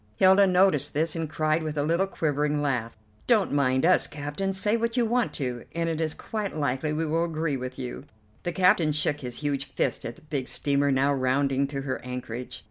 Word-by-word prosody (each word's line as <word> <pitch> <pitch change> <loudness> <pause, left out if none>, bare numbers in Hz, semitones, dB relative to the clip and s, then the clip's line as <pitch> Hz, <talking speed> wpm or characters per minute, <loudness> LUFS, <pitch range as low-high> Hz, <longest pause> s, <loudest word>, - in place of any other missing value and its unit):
Hilda 190 - +6
noticed 180 -7 +3
this 160 +2 0
and 165 -2 -3
cried 155 +1 +1
with 155 -1 -4
a 145 - +1
little 170 +5 +1
quivering 150 -4 0
laugh: 125 -6 -2 0.3
"Don't 220 -5 +3
mind 130 -1 +2
us, 185 +1 +4
captain; 145 +7 -3
say 205 +3 +1
what 230 +1 -1
you 240 - +3
want 240 +1 +1
to, 125 -4 -4
and 170 0 0
it 165 -1 -1
is 155 -1 -1
quite 210 -5 -4
likely 145 +1 -1
we 155 +2 -1
will 165 +2 +1
agree 160 -3 -1
with 130 0 -5
you." 125 -2 -6 0.4
The 175 - -2
captain 180 -4 +3
shook 150 0 0
his 125 -2 -6
huge 140 -2 -1
fist 125 - 0
at 115 - -5
the - - -19
big 145 -4 -3
steamer 140 0 0
now 135 +1 +2
rounding 135 +1 +1
to 140 -1 -4
her 135 -1 -4
anchorage. 125 -1 -6
150 Hz, 210 wpm, -26 LUFS, 135-170 Hz, 0.4 s, Hilda